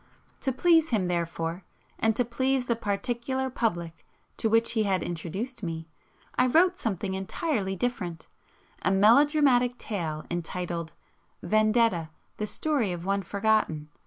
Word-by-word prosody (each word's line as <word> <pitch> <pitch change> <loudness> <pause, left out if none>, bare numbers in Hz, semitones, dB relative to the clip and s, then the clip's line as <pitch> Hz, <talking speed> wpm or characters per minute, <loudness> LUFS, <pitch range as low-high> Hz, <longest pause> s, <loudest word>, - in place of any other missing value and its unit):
To 265 - -1
please 325 +4 +4
him, 205 -6 +1
therefore, 170 0 -2 0.4
and 225 -1 +2
to 245 - +1
please 260 +2 0
the 235 - +1
particular 240 +5 -2
public 170 -9 -2 0.3
to 225 - +1
which 225 +1 +3
he 225 -2 +1
had 195 -4 +1
introduced 190 +9 -4
me, 165 -3 -5 0.4
I 250 - +3
wrote 350 +7 +4
something 200 - -2
entirely 195 - -2
different, 185 -7 -3 0.6
a - - +1
melodramatic 245 +4 +4
tale 160 -7 -4
entitled: 175 -1 -3 0.5
"Vendetta: 215 -3 +2 0.3
The 210 - -2
Story 275 -6 0
of 175 0 -5
One 200 +1 +1
Forgotten." 200 -6 0
215 Hz, 130 wpm, -27 LUFS, 175-245 Hz, 0.6 s, please